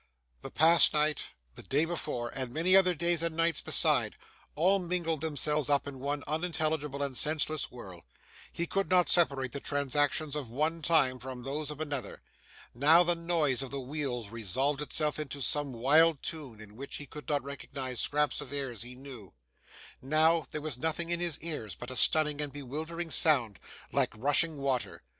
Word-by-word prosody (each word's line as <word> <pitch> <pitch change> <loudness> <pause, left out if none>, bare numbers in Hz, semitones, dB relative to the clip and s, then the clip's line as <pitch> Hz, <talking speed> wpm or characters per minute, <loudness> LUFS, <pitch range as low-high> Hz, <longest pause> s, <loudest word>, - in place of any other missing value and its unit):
The - - -7
past 160 +1 +5
night, 150 0 +2 0.3
the - - -10
day 145 +4 0
before, 130 -8 -4
and 130 -1 -5
many 170 +7 +3
other 185 -2 +5
days 170 0 +1
and 165 -1 -2
nights 165 -1 +1
beside, - - +2 0.4
all 185 +6 +3
mingled 170 -3 -2
themselves 150 -2 0
up 145 -1 +1
in 135 -2 -8
one 145 +2 -3
unintelligible 155 -3 -2
and 140 -2 -4
senseless 155 +1 +1
whirl; 95 -8 -11 0.5
he 170 - -2
could 195 +3 -2
not 180 -1 +3
separate 140 -7 +3
the 140 - -5
transactions 145 +2 0
of 140 -6 -4
one 155 +7 -1
time 145 -6 +3
from 125 0 -8
those 145 +3 -4
of 150 -1 -7
another. 145 -4 -5 0.5
Now, 155 +8 +5
the 175 0 +1
noise 165 -6 0
of 135 - -5
the 140 - -5
wheels 130 -5 -4
resolved 130 +7 -2
itself 150 +1 0
into 145 -1 -5
some 145 +1 0
wild 145 +6 +3
tune 140 -9 -6
in 105 -1 -13
which 140 +4 -8
he 145 - -6
could 150 +2 -10
recognise 140 -3 -3
scraps 150 0 +1
of 140 -2 -9
airs 135 -5 -3
he 125 +2 -8
knew; 125 -8 -11 0.7
now, 155 +4 +2
there 150 - -5
was 145 -5 -3
nothing 160 +2 -1
in 170 - 0
his 175 -3 0
ears 150 -10 -3
but 120 +1 -8
a - - -6
stunning 150 +1 +3
and 145 -1 -3
bewildering 155 +5 -6
sound, 125 - +3 0.3
like - - +1
rushing 145 +6 +2
water. 135 -3 -3
145 Hz, 175 wpm, -30 LUFS, 135-160 Hz, 0.7 s, past